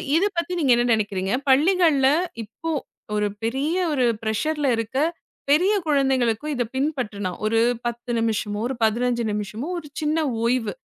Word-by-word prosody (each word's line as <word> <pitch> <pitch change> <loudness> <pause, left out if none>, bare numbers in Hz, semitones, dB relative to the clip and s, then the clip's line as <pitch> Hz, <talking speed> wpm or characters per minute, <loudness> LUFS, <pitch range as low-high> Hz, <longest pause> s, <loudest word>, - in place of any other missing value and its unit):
இது 350 +5 +4
பத்தி 340 +1 -1
நீங்க 290 -6 +2
என்ன 240 - +2
நெனைக்கிறீங்க? 200 -3 -1 0.2
பள்ளிகள்ல 305 -1 +4 0.3
இப்போ 230 +10 -7 0.5
ஒரு 210 0 +1 0.2
பெரிய 270 +8 0 0.2
ஒரு 270 -4 +1 0.2
பிரஷர்ல 290 +7 0
இருக்க 230 +3 -3 0.5
பெரிய 355 +8 +4
குழந்தைகளுக்கும் 270 -2 +1
இத 250 - +1
பின்பற்றணும். 230 - -2
ஒரு 225 +1 +2 0.3
10 240 +1 -3
நிமிஷமோ, 215 -2 -1
ஒரு 265 - -3
15 235 +2 +1
நிமிஷமோ 210 +6 -4
ஒரு 320 -3 -7
சின்ன 310 +1 +1 0.2
ஓய்வு. 235 -1 +1
250 Hz, 140 wpm, -23 LUFS, 220-300 Hz, 0.5 s, இது